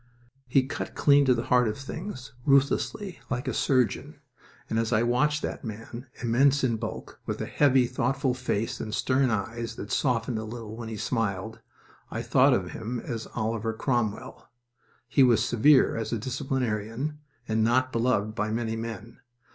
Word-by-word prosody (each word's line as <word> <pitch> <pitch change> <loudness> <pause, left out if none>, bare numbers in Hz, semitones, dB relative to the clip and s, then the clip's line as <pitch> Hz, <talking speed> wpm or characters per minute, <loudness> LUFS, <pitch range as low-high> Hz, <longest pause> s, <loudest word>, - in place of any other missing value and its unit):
He 130 +1 +3
cut 135 - -5
clean 145 -1 +5
to 130 -2 +4
the 115 - -2
heart 125 -1 +3
of 105 - -2
things, 135 0 -7
ruthlessly, 140 +8 +1
like 125 -1 -2
a - - 0
surgeon, 130 -4 0 0.5
and 110 - 0
as 115 0 -1
I 110 0 +3
watched 150 +5 +1
that - - -4
man, 115 +3 -7 0.2
immense 135 +4 +3
in 120 -3 +2
bulk, - - -6
with - - -3
a - - -2
heavy, 135 -3 +3
thoughtful 130 +2 0
face 125 -3 -2
and 110 -1 -3
stern 130 0 +2
eyes 115 +2 -3
that 105 - -7
softened 120 -3 0
a - - -4
little 110 -1 -7
when 115 -1 -6
he 110 - -5
smiled, 110 0 -2 0.5
I - - -4
thought - - +4
of - - -2
him 115 +2 -4
as 115 -3 -5
Oliver 115 0 -1
Cromwell. 115 -3 -2 0.6
He 135 - +3
was 120 -3 +5
severe 130 +4 +4
as 115 - -3
a 115 - 0
disciplinarian, 130 +1 -2 0.3
and 110 0 +1
not 130 +3 +2
beloved 115 -3 +1
by 110 -1 -1
many 115 0 -1
men. 115 0 -7
120 Hz, 170 wpm, -27 LUFS, 110-130 Hz, 0.6 s, clean